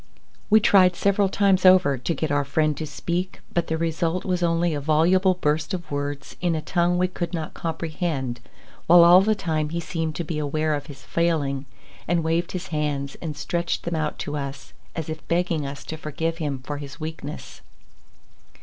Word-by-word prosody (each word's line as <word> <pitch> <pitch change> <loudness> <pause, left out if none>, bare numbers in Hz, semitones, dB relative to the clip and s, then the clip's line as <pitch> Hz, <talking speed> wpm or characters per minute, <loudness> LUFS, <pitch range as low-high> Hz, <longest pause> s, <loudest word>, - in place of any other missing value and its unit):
We 215 0 +7
tried 185 -4 +5
several 200 +1 +2
times 195 -1 +3
over 185 -6 +6
to 125 +6 -2
get 155 -2 -2
our 145 0 +2
friend 150 +2 +1
to 155 - -5
speak, 175 +5 -3
but 170 - 0
the 160 - -1
result 165 +2 -1
was 180 -2 0
only 170 0 +2
a 145 - -2
voluble 175 +5 +3
burst 155 0 0
of 175 -4 -8
words 145 0 -4
in 175 -2 +1
a - - -1
tongue 175 +2 +1
we 180 +1 +2
could 175 -1 -4
not 160 -2 -4
comprehend, 160 -6 -3 0.5
while 170 +1 +8
all 175 +2 +8
the 215 +2 +2
time 155 -5 -1
he 170 +2 -2
seemed 160 -2 -3
to 170 - -2
be 155 -1 -3
aware 155 +1 0
of 145 +1 -3
his 135 -4 -11
failing, 145 -5 0 0.4
and 170 0 +1
waved 165 +2 0
his 185 +1 -5
hands 145 -3 -2
and 155 -3 -5
stretched 170 +3 -2
them 170 - -3
out 155 -1 -2
to 145 - -4
us 140 -1 -6 0.2
as 160 -2 -4
if 155 0 -7
begging 170 -4 0
us 140 +1 -7
to 160 - -6
forgive 165 +2 -3
him 140 -5 -3
for 145 +1 -4
his 145 +2 -9
weakness. 155 -1 -7
160 Hz, 195 wpm, -24 LUFS, 150-175 Hz, 0.5 s, while